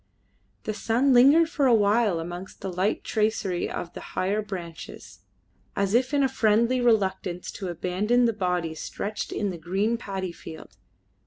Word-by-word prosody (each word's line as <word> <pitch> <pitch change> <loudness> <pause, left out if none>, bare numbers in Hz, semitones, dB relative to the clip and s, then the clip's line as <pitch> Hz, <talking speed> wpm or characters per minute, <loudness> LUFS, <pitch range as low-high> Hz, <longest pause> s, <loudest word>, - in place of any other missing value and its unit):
The 215 - -3
sun 240 +6 +2
lingered 280 +7 +6
for 290 -4 +1
a 240 - +6
while 205 -3 +2
amongst 175 +3 -7
the 190 -1 -4
light 190 +4 0
tracery 210 -5 -1
of 175 - -5
the - - -8 0.2
higher 200 +3 +1
branches, 180 -6 -8 0.6
as 200 0 0
if 250 +3 +2
in 280 -2 +3
friendly 235 0 +2
reluctance 190 -6 0
to 190 - -6
abandon 185 +8 +1
the 230 - +2
body 180 -5 -1
stretched 205 +6 -5
in 205 -2 -1
the 175 - -7
green 195 +7 0
paddy 195 -5 -4
field. 160 -1 -11
205 Hz, 155 wpm, -26 LUFS, 180-235 Hz, 0.6 s, lingered